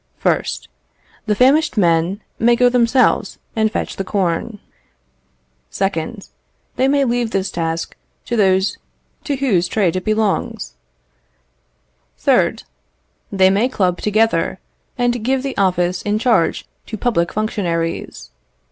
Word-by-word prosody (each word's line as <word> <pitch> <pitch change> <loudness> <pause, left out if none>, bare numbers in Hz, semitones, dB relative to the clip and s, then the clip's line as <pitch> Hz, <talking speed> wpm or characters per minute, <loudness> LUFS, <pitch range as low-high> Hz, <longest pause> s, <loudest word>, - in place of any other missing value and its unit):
1st. - - 0 0.6
The 210 - +2
famished 275 +4 +3
men 175 +2 +2 0.2
may 235 +1 +4
go 245 +1 +4
themselves 245 +1 +2 0.2
and 220 -1 +1
fetch - - -3
the 195 - -2
corn. 190 +2 -1 1.1
2nd. 195 +2 -3 0.5
They 260 - +2
may 280 0 +2
leave 240 -1 0
this 195 -2 -2
task 165 -1 -3 0.3
to 240 - -2
those 195 -2 +2 0.5
to 290 -4 -1
whose 220 -11 +1
trade 185 -3 +1
it 185 - -2
belongs. 215 -2 -1 1.5
3rd. - - +2 0.7
They 190 -1 +4
may 210 +6 +2
club 180 -7 0
together, 210 -5 +1 0.4
and 245 -2 0
give 260 +2 0
the 275 -1 -4
office 180 -2 +1
in 210 +1 0
charge 220 -7 +1 0.2
to 220 - -5
public 190 -7 0
functionaries. 170 - -3
210 Hz, 120 wpm, -18 LUFS, 185-240 Hz, 1.5 s, may